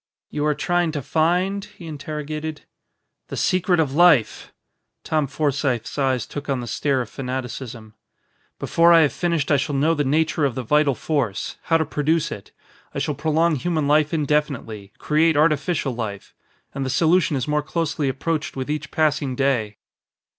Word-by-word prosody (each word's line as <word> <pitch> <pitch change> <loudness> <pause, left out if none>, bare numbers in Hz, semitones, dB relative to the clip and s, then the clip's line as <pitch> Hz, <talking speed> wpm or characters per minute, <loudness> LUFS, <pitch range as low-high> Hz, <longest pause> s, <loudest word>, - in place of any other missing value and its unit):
"You 150 0 -1
are 150 - +1
trying 175 0 0
to 145 - -2
find?" 180 +7 +1
he 190 -3 -13
interrogated. 155 0 -5 0.7
"The - - -6
secret 180 -1 +2
of 145 -4 +1
life!" 160 -7 +3 0.5
Tom 155 -3 0
Forsythe's 135 -4 -1
eyes 130 -4 0
took 145 0 -7
on 135 -2 0
the 120 - -5
stare 130 +4 0
of 120 - -6
fanaticism. 125 -4 -6 0.6
"Before 170 +1 +4
I 165 - +7
have 150 - +2
finished 170 -5 -1
I 145 - +5
shall 140 +1 -2
know 150 +4 +3
the 150 -2 0
nature 155 +3 +1
of 135 -4 +1
the 130 - -3
vital 150 +2 +2
force 130 -11 -2
how 165 - +3
to 160 - 0
produce 150 +2 0
it. 100 - -8 0.4
I - - -3
shall 140 +2 -1
prolong 160 +2 +1
human 155 0 -1
life 150 +1 +3
indefinitely; 140 - -1
create 155 +2 +2
artificial 150 -2 +1
life. 110 -4 -6 0.4
And 135 - -3
the 130 - -2
solution 165 +2 +3
is 130 0 -2
more 150 0 +1
closely 155 -2 -1
approached 150 +4 -2
with 135 +2 -3
each 150 - -3
passing 150 -4 0
day." 120 -7 0
150 Hz, 170 wpm, -22 LUFS, 135-160 Hz, 0.7 s, I